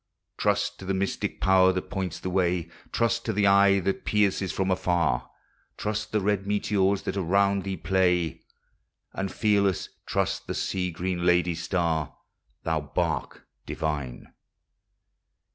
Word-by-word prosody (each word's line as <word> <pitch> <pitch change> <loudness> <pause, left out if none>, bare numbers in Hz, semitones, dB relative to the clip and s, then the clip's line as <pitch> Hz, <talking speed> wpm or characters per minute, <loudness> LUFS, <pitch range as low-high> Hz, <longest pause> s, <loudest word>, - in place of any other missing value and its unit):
Trust 105 0 0
to 95 - -9
the 95 0 -1
mystic 95 +1 -2
power 95 0 +5
that 95 - -4
points 95 -4 -3
thy 95 - -4
way, 90 -2 +1 0.2
Trust 115 0 +1
to 110 - -1
the 100 0 +2
eye 100 0 +5
that 95 +1 -2
pierces 100 -2 +1
from 95 0 0
afar; 85 -9 +1 0.5
Trust 105 +1 -3
the 105 - +2
red 100 0 0
meteors 100 -1 +1
that - - -3
around 100 +1 +2
thee 95 -1 -3
play. 90 -2 +1 0.7
And, 95 -1 -3
fearless, 100 -4 +1 0.2
trust - - -1
the - - -3
Sea 90 -1 -1
Green 90 +1 -3
Lady's 90 -1 +2
star. 85 -4 -1 0.5
Thou 80 -1 0
bark 75 0 -3 0.2
divine! 75 -6 -4
95 Hz, 140 wpm, -26 LUFS, 85-100 Hz, 0.7 s, power